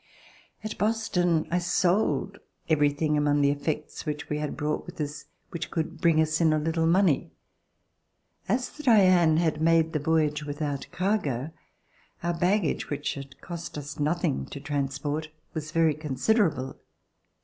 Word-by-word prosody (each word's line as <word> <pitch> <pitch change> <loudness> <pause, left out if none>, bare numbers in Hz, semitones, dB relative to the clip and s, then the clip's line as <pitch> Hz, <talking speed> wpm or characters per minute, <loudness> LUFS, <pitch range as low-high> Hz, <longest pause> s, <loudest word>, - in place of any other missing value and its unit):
At 215 0 -5
Boston 180 -7 +1
I 175 - +2
sold 185 +3 +1 0.3
everything 150 0 +2
among 145 0 +2
the 140 0 +4
effects 150 +1 -3
which 150 -1 -4
we 150 - -1
had 150 -1 -3
brought 150 0 -2
with - - -10
us 145 -1 -4 0.3
which 170 - -4
could 160 -2 -3
bring 165 -2 +4
us 155 +1 +2
in 160 -1 +5
a - - +2
little 160 +1 0
money. 175 -4 +3 1.2
As 250 +5 0
the 300 - -10
''Diane" 185 - +5
had 160 -2 +1
made 165 0 +3
the 155 - +1
voyage 150 -1 +1
without 145 -1 -3
cargo, 160 - -1 0.7
our 175 0 0
baggage, 180 +1 0
which 145 0 -2
had 135 -1 -10
cost 170 -3 -7
us 145 +1 -7
nothing 150 - 0
to - - -7
transport, 145 +2 -2 0.2
was 155 -1 -4
very 165 -1 +3
considerable. 150 - 0
155 Hz, 150 wpm, -27 LUFS, 145-175 Hz, 1.2 s, in